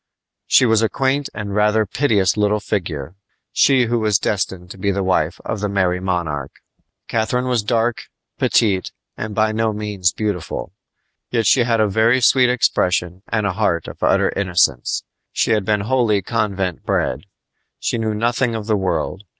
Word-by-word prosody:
She 130 - +5
was 115 -2 +3
a 110 - +2
quaint 135 +5 0
and 105 -2 -6
rather 105 +1 +2
piteous 105 -5 +1
little 105 0 +1
figure, 85 -8 -4 0.4
she 130 -3 +4
who 120 +1 0
was 105 -2 +2
destined 95 -3 -3
to 95 - -11
be 100 - 0
the 100 0 0
wife 90 -3 0
of 110 - -3
the 105 0 -2
Merry 95 -2 +1
Monarch. 85 -7 -3 0.5
Catharine 120 +3 0
was 125 -3 +1
dark, 115 +2 0 0.3
petite, 100 -5 +2 0.2
and 105 -1 -5
by 110 +1 +2
no 110 0 0
means 105 -4 -1
beautiful; 105 -6 -4 0.6
yet 115 -2 0
she 120 +2 +4
had 115 -2 +1
a 110 - +3
very 110 +5 +3
sweet 125 0 +4
expression 90 -7 0
and 110 -2 -1
a 100 - 0
heart 90 -4 0
of - - -10
utter - - +3
innocence. 85 -10 0 0.3
She - - +1
had 105 -3 +1
been 105 -1 +1
wholly 110 -3 +1
convent 100 -5 -2
bred. 70 +10 -1 0.5
She 115 - -2
knew 110 -1 -1
nothing 120 +2 0
of 110 -2 -4
the 110 -1 +1
world. 95 +1 -2
105 Hz, 170 wpm, -19 LUFS, 95-115 Hz, 0.6 s, She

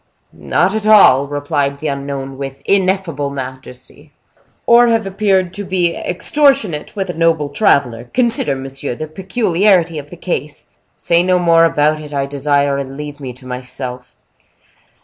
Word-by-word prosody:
"Not 195 - 0
at 215 -1 -2
all!" 140 -11 +6
replied 145 -1 -2
the 155 - -8
unknown, 140 -1 -5
with 135 0 -7
ineffable 185 -7 0
majesty. 130 +1 -9 0.5
"Or 240 +1 +6
have 225 -2 +1
appeared 195 -2 0
to 205 - -5
be 180 -3 0
extortionate 265 - 0
with 195 -3 -2
a - - -10
noble 165 -3 +1
traveler. 135 - +1
Consider, 240 - 0
monsieur, 135 -1 -5
the 155 - -5
peculiarity 185 -1 +1
of 145 0 -11
the 175 - -11
case." 150 -4 -4 0.3
"Say 170 0 +2
no 185 0 +2
more 165 -1 +4
about 155 -1 +1
it, 150 -1 -8
I 140 -1 0
desire; 140 0 0
and 135 0 -6
leave 150 -1 -7
me 130 -3 -6
to 130 +1 -16
myself." 125 0 -7
150 Hz, 150 wpm, -16 LUFS, 140-185 Hz, 0.5 s, all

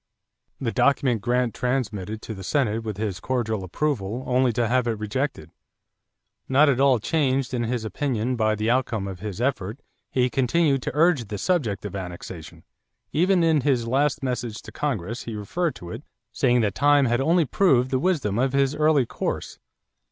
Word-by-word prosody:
The 120 -4 -1
document 130 -5 +2
Grant 125 +1 +1
transmitted 110 -5 -2
to 110 - -5
the 95 -2 -9
Senate 115 -2 0
with 110 -3 -5
his 105 -4 -3
cordial 110 -6 -2
approval, 115 - -2
only 130 0 +2
to 115 +1 +1
have 125 +1 +1
it 115 -2 -1
rejected. 105 - -3 1.0
Not 140 +3 +5
at 130 -2 +1
all 135 -2 +5
changed 135 +1 0
in 120 -2 0
his 115 -1 -2
opinion 125 0 -1
by 110 -2 +1
the 105 +1 -2
outcome 120 -5 0
of 95 -2 -7
his 105 0 -6
effort, 120 -3 -1 0.3
he 125 -1 +2
continued 135 +2 +1
to - - -3
urge 155 - +3
the 105 - -4
subject 115 - -1
of 100 - -5
annexation. 90 -3 -8 0.5
Even 180 +2 +3
in 160 -3 +3
his 125 -4 +1
last 140 +4 +1
message 120 -4 -3
to - - -10
Congress 115 - -3
he 115 - -5
referred 145 - -2
to 85 -3 -9
it, 115 - -6 0.3
saying 125 -2 +2
that 105 -3 0
time 145 -1 +4
had 120 +1 +1
only 165 +3 +3
proved 130 -6 +2
the 130 - +1
wisdom 135 - 0
of 130 +1 +1
his 140 0 +2
early 150 -3 +3
course. - - -4
125 Hz, 180 wpm, -24 LUFS, 110-140 Hz, 1.0 s, Not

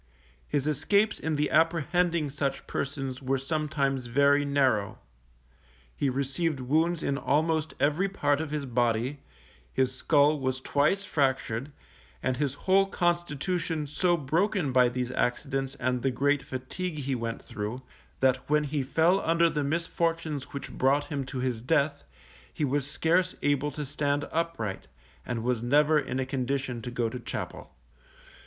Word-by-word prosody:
His 145 -2 0
escapes 200 +9 +2
in 160 -1 -1
the 150 0 0
apprehending 165 0 +2
such 140 -1 -2
persons 135 -2 -3
were 135 +1 0
sometimes 140 -2 -1
very 140 +3 +4
narrow; 135 -8 +1 1.0
he 140 - 0
received 140 +3 -1
wounds 160 +6 +1
in 140 0 0
almost 155 0 +1
every 155 +7 +2
part 145 -6 +1
of 160 - -4
his 150 -1 -3
body, 120 +2 0 0.5
his 130 -1 +1
skull 145 +2 +3
was 130 -1 -1
twice 150 +9 +1
fractured, 135 -3 0 0.5
and 130 - +1
his 140 0 -1
whole 195 +1 +5
constitution 175 -2 -1
so 175 +4 +1
broken 165 +2 0
by 125 -1 +5
these 125 0 -3
accidents 135 +3 -1
and 125 -1 -1
the 135 - +1
great 140 +3 +1
fatigue 150 +8 -5
he 140 -2 -2
went 115 -2 -3
through, 110 +5 -5 0.4
that 130 0 +2
when 150 0 +3
he 145 0 -1
fell 165 +8 +3
under 165 -1 +3
the 150 -1 -1
misfortunes 165 -1 -1
which 140 - -7
brought 140 +3 +2
him 140 -3 -3
to 135 - -5
his 125 -3 -1
death, 145 +2 +1 0.5
he 150 - -1
was 140 0 -1
scarce 180 +4 +1
able 145 0 +2
to 150 +1 -5
stand 145 +1 -1
upright, 160 -12 -2 0.4
and 120 -2 -2
was 120 -2 0
never 150 +5 +4
in 130 -2 -3
a 130 - 0
condition 130 -1 -2
to 125 - -5
go 120 -1 -1
to 125 +3 -5
chapel. 120 - -6
145 Hz, 150 wpm, -28 LUFS, 130-160 Hz, 1.0 s, whole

